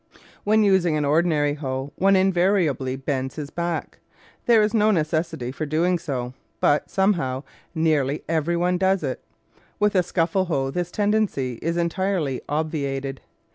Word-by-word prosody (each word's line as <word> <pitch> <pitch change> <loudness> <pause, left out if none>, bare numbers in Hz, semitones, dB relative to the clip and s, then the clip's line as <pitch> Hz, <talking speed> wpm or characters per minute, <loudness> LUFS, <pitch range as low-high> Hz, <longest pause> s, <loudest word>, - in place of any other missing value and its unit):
When 215 +1 +3
using 185 -6 +3
an 150 - 0
ordinary 150 -1 +2
hoe, 135 -1 -4
one 195 +1 +3
invari 190 0 +3
ably 130 -2 -2
bends 135 -1 -3
his 150 -2 -6
back. 170 -1 -3 0.5
There 230 -3 +6
is 210 - 0
no 215 -1 +3
necessity 160 - -1
for 155 +3 -4
doing 170 +4 +1
so, 130 -6 -4 0.3
but, 145 0 +2
somehow, 165 -10 0 0.3
nearly 155 -3 +1
every 165 +1 0
one 180 +1 +1
does 190 -2 +2
it. 130 -3 -3 0.6
With 210 0 +2
a 185 - +4
scuffle 175 +1 0
hoe 135 -6 -1
this 175 +3 -2
tendency 205 - 0
is 170 +1 -1
entirely 170 -5 -1
obviated. 140 -3 -2
165 Hz, 150 wpm, -23 LUFS, 140-185 Hz, 0.6 s, There